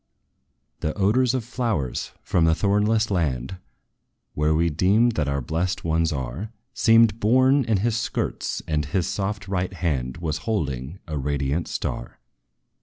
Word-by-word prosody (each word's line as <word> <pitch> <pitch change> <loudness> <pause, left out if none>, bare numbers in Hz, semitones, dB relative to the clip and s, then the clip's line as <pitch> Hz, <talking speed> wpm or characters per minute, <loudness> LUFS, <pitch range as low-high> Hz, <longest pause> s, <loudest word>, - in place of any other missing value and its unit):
The 75 - -2
odors 120 +6 +3
of 130 - -1
flowers, 115 - -2
from 85 - +2
the 80 0 +4
thornless 105 +3 +2
land 75 -3 -1 0.8
Where 75 +1 +1
we 85 +1 +2
deem 100 +10 +3
that 75 -9 -1
our 70 0 -1
blest 80 +8 -2
ones 80 0 +1
are, 70 - -4 0.2
Seemed 115 -2 +4
borne 130 +5 +4
in 110 -5 +1
his 115 -2 +1
skirts; 115 - -2
and 75 -1 0
his 90 +3 0
soft 100 0 -3
right 95 -1 -2
hand 70 -8 -2
Was 80 -2 -2
holding 75 - -3
a 75 -3 -3
radiant 70 +3 -1
star. - - -4
90 Hz, 145 wpm, -24 LUFS, 75-110 Hz, 0.8 s, the